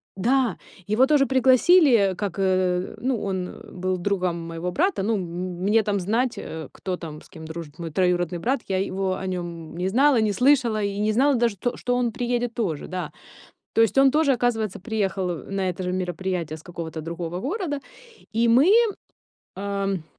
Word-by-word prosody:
да, 245 +5 +1 0.3
его 230 +6 +3
тоже 290 -2 +4
пригласили, 260 - +5
э, - - -5
как, 200 -3 -3
э 185 0 +1
ну, 250 0 0
он, 190 -2 -2
э, - - -12
был 185 0 -2
другом 180 -2 -1
моего 165 +2 -4
брата. 365 - +1
Ну, 220 +3 +1
м, 195 - -1
м, 175 +1 -5
мне 215 +3 +4
там 205 -1 -1
знать, 230 +7 0
э, 160 -1 -6
кто 185 -2 -4
там, 155 -2 -8
с - - -19
кем 160 -3 -11
дружит 160 -1 -8
мой 165 -1 -4
троюродный 175 0 +1
брат. 245 +8 0
Я 190 - 0
его 190 0 -1
о 190 - -6
нём 170 -3 -5
не 180 +2 -1
знала, 260 +1 +4
не 215 -1 +2
слышала, 245 -2 +3
и 200 0 -2
не 215 +1 +2
знала 275 +5 +4
даже 230 -4 +1
то, 245 +6 -2
что 245 0 -1
он 245 -2 +1
приедет 245 -1 -1
тоже, 185 - -2
да. 185 0 -4 0.6
То 225 - +5
есть 225 +4 +2
он 270 0 +7
тоже, 295 -1 +3
оказывается, 225 -6 0
приехал, 195 -4 -1
э, 170 +3 -6
на 195 -1 -1
это 180 +1 -4
же 180 0 -2
мероприятие 180 -3 -3
с 160 - -14
какого-то 165 -2 -6
другого 170 +1 -5
города. 300 - -2 0.5
И 230 +1 +2
мы, 265 +11 +5 0.9
ам, 195 -3 -2
195 Hz, 195 wpm, -24 LUFS, 180-245 Hz, 0.9 s, он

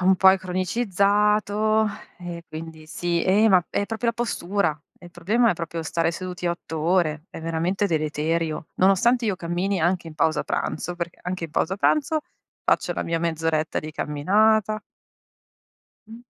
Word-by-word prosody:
Un 185 +1 +4
po' 190 +1 +7
è 190 - +2
cronicizzato 210 +3 +1 0.3
e 175 -1 -7
quindi 160 0 -9
sì. 170 +1 -1
Eh, 205 +4 +4
ma 185 -4 +5
è 200 - -1
proprio 225 +2 -2
la - - +3
postura. 200 -8 -1 0.2
Il 175 - -13
problema 215 +8 +2
è - - 0
proprio 165 0 -5
stare 165 +1 0
seduti 180 0 -5
8 170 -2 -3
ore, 155 -2 +1
è - - -8
veramente 165 +5 0
deleterio. 155 -1 -1
Nonostante 225 +6 +3
io 200 -3 0
cammini, 180 +3 -1
anche 175 +1 +1
in 155 - -11
pausa 155 0 +1
pranzo, 175 +3 -3
perché 170 -1 -5
anche 180 -1 -3
in 165 - -7
pausa 180 +4 0
pranzo 305 - +2 0.4
faccio - - +2
la - - -3
mia 165 0 -1
mezz'oretta 160 -1 0
di 155 0 -6
camminata 215 +9 +2 1.3
Mh. 225 +2 -11
180 Hz, 160 wpm, -24 LUFS, 165-205 Hz, 1.3 s, po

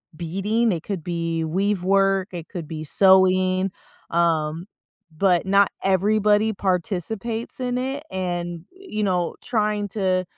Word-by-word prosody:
beading, 195 +8 0
it 170 -2 -3
could 190 -6 -4
be 165 -1 -2
weave 190 +4 0
work, 195 0 +2
it 170 -2 -6
could 170 -6 -6
be 155 -1 -6
sewing, 185 +2 +4 0.4
um, 165 0 0 0.5
but 180 -2 +3
not 200 +1 +4
everybody 210 +3 +2
participates 200 +6 -2
in 250 -1 -1
it, 270 +3 -3
and, 175 -2 -3
you 370 - -6
know, 180 -3 0
trying 210 -2 0
to 185 -2 0
190 Hz, 125 wpm, -23 LUFS, 175-210 Hz, 0.5 s, sewing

